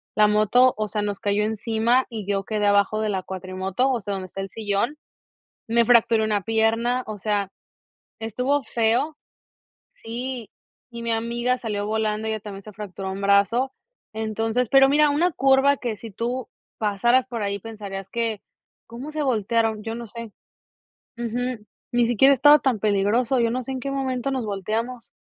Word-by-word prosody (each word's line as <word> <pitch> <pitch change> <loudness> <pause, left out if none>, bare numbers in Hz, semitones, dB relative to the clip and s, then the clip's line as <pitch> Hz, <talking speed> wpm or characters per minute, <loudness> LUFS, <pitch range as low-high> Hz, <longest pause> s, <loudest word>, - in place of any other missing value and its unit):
La 210 0 +5
moto, 215 +5 +4
o 215 0 -1
sea, 210 0 -2
nos 205 -1 -3
cayó 205 +1 +1
encima 225 +3 +1
y 220 -4 -6
yo 195 0 -1
quedé 210 0 -1
abajo 205 +1 +3
de 215 - 0
la 190 -2 -1
cuatrimoto, 190 +6 -2
o 245 -3 -1
sea, 200 0 -4
donde 190 -1 -5
está 195 - -6
el 195 - -5
sillón, 220 +7 -1 0.7
me 235 +1 +3
fracturé 230 -1 +4
una 210 -2 +1
pierna, 225 +4 +1
o 215 -1 -7
sea, 200 -1 -1 0.7
estuvo 250 +6 0
feo 240 +8 0 0.8
Sí, 245 - -6 0.4
y 235 -1 -7
mi 230 -1 0
amiga 235 +2 0
salió 210 -4 -3
volando, 220 0 -1
ella 220 0 -2
también 200 -1 -8
se 215 - -11
fracturó 195 -2 -6
un 195 - -6
brazo, 200 +7 +3 0.4
entonces, 220 +2 -1
pero 270 0 +6
mira 300 +1 +5
una 335 +5 +2
curva 270 0 +4
que 235 -4 -3
si 225 +2 -9
tú 240 +4 -3 0.3
pasaras 240 +5 +2
por 230 -3 -4
ahí 200 0 -1
pensarías 195 -3 -7
que, 230 -2 -2 0.4
¿cómo 245 +6 -8
se 305 0 -3
voltearon? 225 -3 0
Yo 225 +1 -4
no 235 0 -6
sé. 230 0 -9 0.8
Ujú. 240 -1 -3 0.3
Ni 240 -1 +3
siquiera 245 +4 +5
estaba 290 +3 +6
tan 260 -5 +1
peligroso, 220 +5 +2
yo 230 -1 +2
no 255 +2 -2
sé 265 - -5
en 260 - -4
qué 275 - -4
momento 270 -1 -2
nos 260 -3 -2
volteamos. 220 +5 -3
225 Hz, 175 wpm, -24 LUFS, 210-250 Hz, 0.8 s, pero